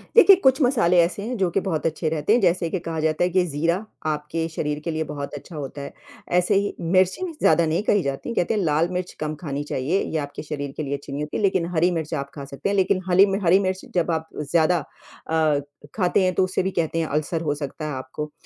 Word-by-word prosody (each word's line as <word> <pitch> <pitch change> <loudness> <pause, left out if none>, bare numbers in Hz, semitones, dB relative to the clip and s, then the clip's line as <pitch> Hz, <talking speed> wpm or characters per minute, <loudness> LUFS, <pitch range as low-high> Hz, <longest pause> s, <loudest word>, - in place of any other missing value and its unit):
देखिए, 405 -4 +9
कुछ 265 -6 +3
मसाले 225 -9 +3
ऐसे 175 +4 -1
हैं 250 - -2
जो 190 -3 +1
कि 195 - +1
बहुत 160 -4 -1
अच्छे 160 0 0
रहते 155 +5 +1
हैं, 240 - +4
जैसे 175 -2 +2
कि 185 - -2
कहा 160 -1 -2
जाता 155 +2 +1
है 180 - +2
कि 185 0 +2
जीरा 165 +4 +1 0.3
आपके 155 +2 -2
शरीर 150 -1 -2
के 170 - -1
लिए 160 0 -1
बहुत 145 -2 -6
अच्छा 150 +3 -9
होता 140 -1 -6
है। 140 - -7 0.5
ऐसे 180 +3 +1
ही 200 +1 +1
मिर्ची 185 - +2
भी 350 - -5
ज़्यादा 170 - +4
नहीं 160 +4 0
कही 205 -3 +2
जाती 140 +7 -3
है 235 - -4
कहते 175 - +1
हैं 210 - 0
लाल-मिर्च 175 +3 0
कम 155 0 -3
खानी 145 -2 -4
चाहिए 150 +6 -1
ये 160 - -3
आपके 145 +1 -9
शरीर 145 -2 -5
के 155 - -2
लिए 140 -1 -3
अच्छी 140 0 -12
नहीं 145 +2 -2
होती, 150 - -4
लेकिन 190 -4 +1
हरी-मिर्च 165 -1 +1
आप 140 -2 -3
खा 140 -2 -6
सकते 140 +6 -4
हैं, 200 - 0
लेकिन 190 -1 +2
हाल 180 0 +2
ही 195 - +10
में 195 0 -1
हरी 180 +3 +6
मिर्च 190 -1 -1
जब 175 -1 +2
आप 160 0 -2 0.2
ज़्यादा 170 +1 +3 0.5
अ, 155 -2 +2 0.4
खाते 185 -1 +2
हैं 185 - +2
तो 190 - +3
उससे 185 0 0
भी 190 - -1
कहते 165 -2 -1
हैं 160 - 0
अल्सर 155 +3 -1
हो 150 -3 0
सकता 150 +1 -6
है 150 - -3
आपको। 130 +3 -6
165 Hz, 250 wpm, -23 LUFS, 150-185 Hz, 0.5 s, ही